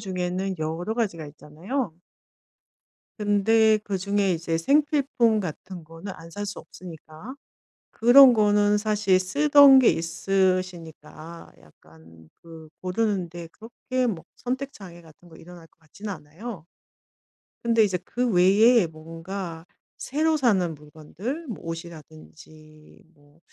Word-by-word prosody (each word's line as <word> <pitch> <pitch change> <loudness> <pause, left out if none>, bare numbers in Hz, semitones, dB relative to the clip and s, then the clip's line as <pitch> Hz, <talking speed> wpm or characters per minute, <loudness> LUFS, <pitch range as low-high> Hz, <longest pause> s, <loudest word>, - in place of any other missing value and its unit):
중에는 185 -1 -3
여러 165 +7 -3
가지가 195 -9 -2
있잖아요. 165 - -5 1.3
근데 215 +1 +3
그중에 200 0 -1
이제 165 -1 -2
생필품 275 - +1
같은 180 0 -8
거는 165 +5 -9
안 165 +1 -13
살 205 +3 -6
수 200 - -6
없으니까 170 - -12 0.6
그런 250 +2 +7
거는 210 -1 +3
사실 210 -3 +1
쓰던 285 +6 +6
게 250 - +5
있으시니까 170 -2 -3
약간 80 +1 -20
그 165 -2 -13
고르는 185 -1 -1
데 170 0 -9
그렇게 250 +3 -4
뭐 180 -8 -4
선택 260 +3 -5
장애 175 -4 -12
같은 165 +2 -19
거 160 - -16
일어날 170 0 -14
것 - - -39
같진 180 +7 -10
않아요. 170 +3 -9 1.0
근데 230 -1 +3
이제 190 -3 0
그 245 0 -2
외에 200 +3 +4
뭔가 165 +2 -8 0.3
새로 310 +3 0
사는 190 - +1
물건들 160 - -8
뭐 225 - -6
옷이라든지 155 -2 -12
뭐 145 +1 -26
185 Hz, 245 characters per minute, -24 LUFS, 165-220 Hz, 1.3 s, 그런